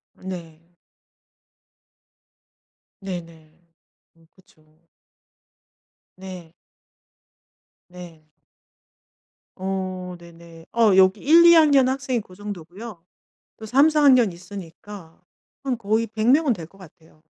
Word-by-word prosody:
네. 170 -4 -9 2.4
네네. 170 -3 -9 0.5
음 165 0 -26
그쵸. 160 -3 -28 1.3
네. 185 -3 -11 1.4
네. 175 -3 -13 1.3
어 185 -1 -5
네네. 170 -1 -15
어 225 -4 +3
여기 190 +2 +4
1-2 340 +3 +7
학년 285 -5 +5
학생이 260 -2 -2
그 185 -3 -17
정도고요. 200 0 -9 0.5
또 220 - -10
3-4 295 +6 +3
학년 255 -7 +5
있으니까 180 0 -12 0.4
한 260 -3 -2
거의 220 +1 -1
100 220 +1 -1
명은 285 -1 +3
될 170 -6 -8
것 195 - -23
같아요. 160 -4 -19
190 Hz, 140 characters per minute, -22 LUFS, 170-230 Hz, 2.4 s, 1-2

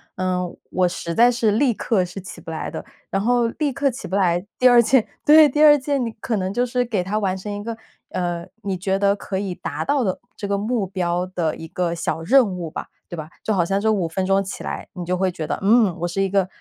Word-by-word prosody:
嗯， 180 -1 -2
我 180 -1 +2
实 170 -1 -4
在 235 +6 +6
是 230 -3 +1
立 240 +3 +2
刻 200 -4 0
是 190 +2 -8
起 185 - -10
不 - - -10
来 160 - -4
的， - - -6 0.3
然 195 - 0
后 240 +2 +2
立 285 +3 -2
刻 275 0 +1
起 265 +3 -8
不 190 - -3
来， 180 -2 +2
第 255 - +6
2 240 -1 +7
件， 240 0 +3 0.2
对， 305 0 +8
第 295 +3 0
2 295 -1 +8
件 275 -1 -1
你 230 - -3
可 225 -4 -1
能 185 0 -2
就 245 +3 +1
是 250 0 0
给 210 -6 -1
他 205 +4 -1
完 190 -3 0
成 200 +2 -6
一 205 0 -4
个， 230 +1 -5 0.4
呃， 175 -2 -2 0.2
你 195 -2 -2
觉 190 +2 0
得 200 0 +3
可 200 -1 -4
以 195 -2 -3
达 - - -4
到 280 -4 +1
的 185 - -1 0.2
这 200 - -4
个 200 - 0
目 215 -1 -1
标 180 -1 -1
的 175 -4 -2
一 160 - -8
个 170 0 -2
小 165 -1 -2
任 245 +7 +5
务 180 -3 -5
吧。 - - -6 0.2
对 175 - -5
吧， 155 0 -6
就 215 - 0
好 180 -4 +2
像 195 +3 0
这 220 0 +2
5 190 -5 0
分 185 +3 -2
钟 195 +1 +3
起 195 +1 -6
来， - - -5
你 180 - -6
就 180 +1 -1
会 190 0 +1
觉 160 - -4
得， - - -3
嗯， 210 -2 +4
我 175 - -1
是 195 +3 -2
一 195 - +1
个， 195 -1 +2
195 Hz, 270 characters per minute, -22 LUFS, 180-235 Hz, 0.4 s, 对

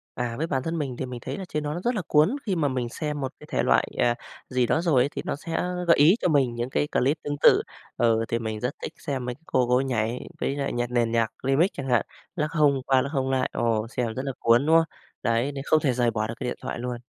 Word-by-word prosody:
À, 120 -1 -2
với 160 +5 -1
bản 135 -4 -1
thân 165 +3 -2
mình 135 -5 -3
thì 130 - -3
mình 125 -1 -7
thấy - - -4
là 195 - -5
trên 150 - -2
đó 150 0 -3
nó 175 - -4
rất 245 - +1
là 210 - -1
cuốn, 155 - +3
khi 190 - 0
mà 150 -4 +2
mình 130 -3 -2
xem 150 +3 -4
một 135 -1 -3
cái - - -12
thể - - +2
loại, - - +3
à, 120 0 +3 0.3
gì 125 -1 +1
đó 160 - +2
rồi 160 -8 +3
ấy 135 - +1
thì - - -4
nó - - -2
sẽ 165 +3 -8 0.3
gợi 170 - +6
ý 150 +6 +6
cho - - +2
mình 135 -6 +2
những 120 +2 -3
cái 145 - 0
clip 140 +5 +2
tương 145 0 -2
tự. - - +7 0.3
Ừ, 115 -1 +2
thì 115 - 0
mình 110 -2 -4
rất 125 +4 -2
thích - - -4
xem 135 -4 -3
mấy 125 0 -3
cái 150 - -26
cô 125 -1 +2
cô 125 - +4
ấy 130 - +2
nhảy 120 -2 -2
với 140 - -1
lại 140 -1 -2
nhạc 120 0 -2
nền 120 -2 +1
nhạc 115 -1 +1
Remix 135 +7 +3
chẳng 135 -1 -6
hạn, 120 -3 +2 0.3
lắc 150 -2 -1
hông 145 -4 +3
qua 130 -1 +4
lắc 140 - -3
hông 135 -2 0
lại, 130 -1 +1
ồ, 115 -2 0
xem 120 -3 -1
rất 130 - -3
là 135 - -2
cuốn, 115 +4 +4
đúng 160 +1 +6
không? 165 - +5 0.4
Đấy, 115 +4 +1
nên 135 -1 -6
không 155 - +4
thể 135 -4 +2
rời 120 -1 +2
bỏ 110 -1 -1
được 115 - -5
cái - - -4
điện - - -3
thoại - - -4
luôn. 125 0 -4
130 Hz, 295 wpm, -25 LUFS, 120-150 Hz, 0.4 s, tự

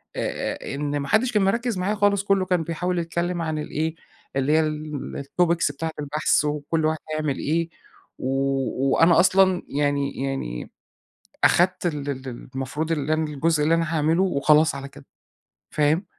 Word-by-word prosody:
أ - - -3
إن 145 0 -2
ما 140 - -4
حدِّش 230 - +2
كان 210 -3 +2
مركِّز 230 +3 0
معايا 190 +4 0
خالص، 205 -1 +2
كله 195 -1 +2
كان 180 -3 +1
بيحاول 175 +2 -2
يتكلِّم 170 +1 -2
عن 160 -1 -2
ال 150 - -5
إيه، 160 +1 -2 0.4
اللي 135 +2 +1
هي 160 - +5
ال 155 -2 -3
الTopics 170 0 +1
بتاعة 160 +3 -4
البحث، 150 +1 +1
وكل 150 +2 -1
واحد 155 0 +1 0.2
هيعمل 155 -3 -1
إيه، 165 +3 -1 0.5
و - - -3 0.6
وأنا 165 +2 +5
أصلًا 185 0 +4
يعني 140 -1 -1
يعني 135 - -4 0.7
أخدت 180 +1 +3
ال 145 -4 -2
ال 135 -1 -5 0.3
المفروض 145 +5 -3
اللي 155 -1 0
أنا 160 0 +1
الجزء 150 +1 0
اللي 160 +2 +3
أنا 165 0 -1
هاعمله 160 +4 +2
وخلاص 155 -3 +3
على 140 0 -6
كده، 135 - -15 0.7
فاهم؟ 155 +5 +2
160 Hz, 165 wpm, -24 LUFS, 145-175 Hz, 0.7 s, هي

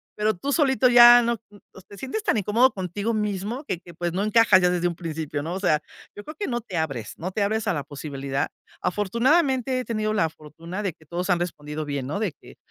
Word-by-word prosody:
pero 215 +1 +1
tú 275 +11 -3
solito 265 -5 +3
ya 240 0 +9
no, 235 0 0
mm, 205 - -16
pues, 190 - -15
te 200 - -13
sientes 265 - -4
tan 230 - +1
incómodo 225 +6 +3
contigo 200 +4 -3
mismo 210 +4 -2
que 185 -9 -3
que 175 -1 -14
pues 175 +1 -3
no 190 +3 -1
encajas 215 -3 +5
ya 180 - +4
desde 175 0 +1
un 175 - -3
principio, 160 -3 -4
¿no? 165 +3 -4
O - - -3
sea, 155 -6 +2 0.3
yo 205 - -9
creo 305 - -8
que 410 - -2
no 240 -2 -1
te 200 -5 -9
abres, 135 -9 -3
no 185 +3 -4
te 205 - -2
abres 220 +2 -1
a - - +2
la 145 -3 -3
posibilidad. 140 -1 -4 0.3
Afortunadamente 255 - +1
he 255 - -4
tenido 215 -2 -1
la 165 -7 +1
fortuna 165 +6 -8
de 195 - -1
que 160 -1 -23
todos 175 +4 -4
han 180 -2 +3
respondido 155 -3 -4
bien, 140 -3 -3
¿no? 155 +8 -3
De 205 -7 -1
que - - -17
195 Hz, 240 wpm, -24 LUFS, 165-230 Hz, 0.3 s, ya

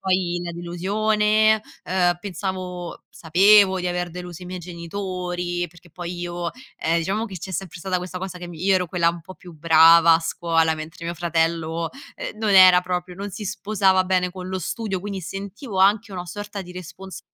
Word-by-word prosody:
Poi 185 -2 0
la 175 - -4
delusione, 210 +5 +2 0.2
uhm, 180 -1 +1
pensavo 185 -2 -5
sapevo 190 +3 +5
di 180 - -3
aver 175 -1 -2
deluso 180 0 -8
i - - -8
miei 185 +1 -6
genitori, 175 0 -4
perché 175 +1 -19
poi 175 +1 -6
io, 175 -1 -3 0.3
ehm, 165 +1 +1
diciamo 195 +7 -1
che 195 -5 -7
c'è 190 +3 -7
sempre 185 -1 -5
stata 185 +1 -1
questa 180 0 -6
cosa 185 -1 -6
che 175 0 -8
mi 165 -2 -10
io 195 0 +4
ero 180 -1 +1
quella 170 -1 +2
un 170 - -8
po' 185 +3 -12
più 180 - -13
brava 165 +1 +6
a - - +4
scuola, 165 -1 +1
mentre 155 +2 -8
mio 170 +1 -3
fratello, 165 -1 -1 0.3
ehm, - - -6
non 215 -1 -1
era 185 -2 +8
proprio 180 0 -4
non 200 +2 -6
si 210 +3 -7
sposava 195 -1 +2
bene 185 -1 +1
con 185 0 -7
lo 185 - -2
studio, 195 +2 -3
quindi 195 0 -5
sentivo 195 - -6
anche 205 +3 +3
una 180 -2 -6
sorta 205 +2 -6
di 180 0 -11
respons 180 0 -9
180 Hz, 190 wpm, -23 LUFS, 170-195 Hz, 0.3 s, era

